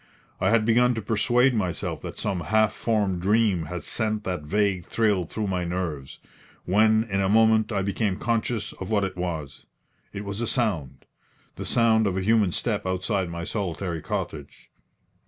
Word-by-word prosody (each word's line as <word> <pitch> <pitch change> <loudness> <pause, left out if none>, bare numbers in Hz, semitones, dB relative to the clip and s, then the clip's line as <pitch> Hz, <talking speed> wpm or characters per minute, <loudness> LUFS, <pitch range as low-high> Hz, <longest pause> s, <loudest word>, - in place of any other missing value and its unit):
I - - +2
had 115 -2 +3
begun 120 +2 +4
to 110 - -3
persuade 120 +5 +2
myself 95 -6 -2
that - - -7
some 95 -3 -2
half 110 +5 +2
formed 100 -6 0
dream 100 -3 +2
had 90 +3 -6
sent 110 -2 -1
that 90 -4 -3
vague 95 +2 0
thrill 105 -6 +1
through 105 +6 -4
my 95 -2 -1
nerves, 85 -6 -4 0.5
when 110 +3 +4
in 100 -4 -1
a 95 - +1
moment 110 +1 +4
I 100 -2 0
became 100 0 -1
conscious 115 -2 -1
of 95 - -7
what 105 -2 +2
it 95 -1 -3
was. 80 -6 -5 0.4
It 100 +1 -6
was 100 +2 -4
a 120 - -1
sound 85 - -1 0.5
the - - -6
sound 110 -2 +3
of 95 -1 -1
a - - 0
human 105 -2 +3
step 105 0 -1
outside 95 0 -1
my 85 0 -5
solitary 90 -3 -3
cottage. - - -6
100 Hz, 175 wpm, -25 LUFS, 90-110 Hz, 0.5 s, begun